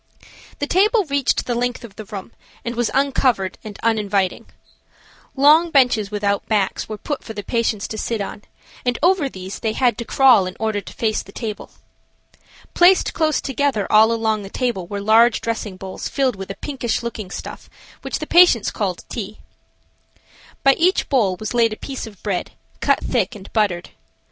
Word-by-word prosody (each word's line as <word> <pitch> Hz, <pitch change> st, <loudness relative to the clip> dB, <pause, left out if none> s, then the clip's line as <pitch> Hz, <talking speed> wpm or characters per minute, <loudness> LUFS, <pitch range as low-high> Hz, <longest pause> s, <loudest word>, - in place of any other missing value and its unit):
The 285 Hz, -, -2 dB
table 410 Hz, +6 st, +3 dB
reached 280 Hz, -4 st, 0 dB
the 245 Hz, -, -1 dB
length 245 Hz, +1 st, -2 dB
of 215 Hz, -4 st, -11 dB
the 215 Hz, -, -8 dB
room 200 Hz, +1 st, -8 dB, 0.3 s
and 235 Hz, -, -2 dB
was 240 Hz, -1 st, 0 dB
uncovered 260 Hz, -8 st, +1 dB
and 210 Hz, -2 st, -8 dB
uninviting. 205 Hz, -4 st, 0 dB, 0.9 s
Long 305 Hz, +5 st, +5 dB
benches 250 Hz, -8 st, +3 dB
without 200 Hz, -1 st, -1 dB
backs 205 Hz, -2 st, 0 dB
were 215 Hz, -, -5 dB
put 290 Hz, +6 st, -5 dB
for 225 Hz, -, -8 dB
the 205 Hz, -1 st, -6 dB
patients 225 Hz, -1 st, -1 dB
to 220 Hz, -, -5 dB
sit 230 Hz, 0 st, -2 dB
on, 205 Hz, +1 st, -5 dB, 0.4 s
and 245 Hz, -1 st, 0 dB
over 350 Hz, -5 st, +3 dB
these 185 Hz, -3 st, -8 dB
they 220 Hz, -2 st, -1 dB
had 245 Hz, 0 st, +1 dB
to -, -, -2 dB
crawl 250 Hz, -6 st, +5 dB
in 185 Hz, -, -8 dB
order 220 Hz, -2 st, -1 dB
to -, -, -11 dB
face 220 Hz, -2 st, -1 dB
the 195 Hz, -, -14 dB
table. 215 Hz, -1 st, -6 dB, 1.0 s
Placed 360 Hz, +2 st, +4 dB
closed 315 Hz, -1 st, 0 dB
together 270 Hz, -6 st, 0 dB
all 220 Hz, +1 st, +6 dB
along 220 Hz, -2 st, 0 dB
the 195 Hz, -, -8 dB
table 230 Hz, -7 st, -2 dB
were 200 Hz, +1 st, -4 dB
large 225 Hz, +3 st, +5 dB
dressing 220 Hz, -4 st, -4 dB
bowls 190 Hz, 0 st, -6 dB
filled 265 Hz, -4 st, 0 dB
with 190 Hz, -1 st, -8 dB
a 195 Hz, -, -5 dB
pinkish 250 Hz, -5 st, -3 dB
looking 220 Hz, -5 st, -5 dB
stuff -, -, -8 dB, 0.3 s
which -, -, -3 dB
the -, -, -5 dB
patients 345 Hz, -, +5 dB
called 190 Hz, -4 st, -3 dB
tea. 215 Hz, -2 st, -6 dB, 1.3 s
By 275 Hz, -, +6 dB
each 365 Hz, +3 st, +2 dB
bowl 210 Hz, -10 st, +2 dB
was 215 Hz, +1 st, -4 dB
laid 230 Hz, -2 st, +3 dB
a -, -, -8 dB
piece 265 Hz, -4 st, -6 dB
of 205 Hz, -3 st, -14 dB
bread, 195 Hz, -4 st, -3 dB, 0.3 s
cut -, -, +2 dB
thick 255 Hz, -, -1 dB
and 200 Hz, -2 st, -12 dB
buttered. 195 Hz, -5 st, 0 dB
225 Hz, 180 wpm, -20 LUFS, 205-265 Hz, 1.3 s, all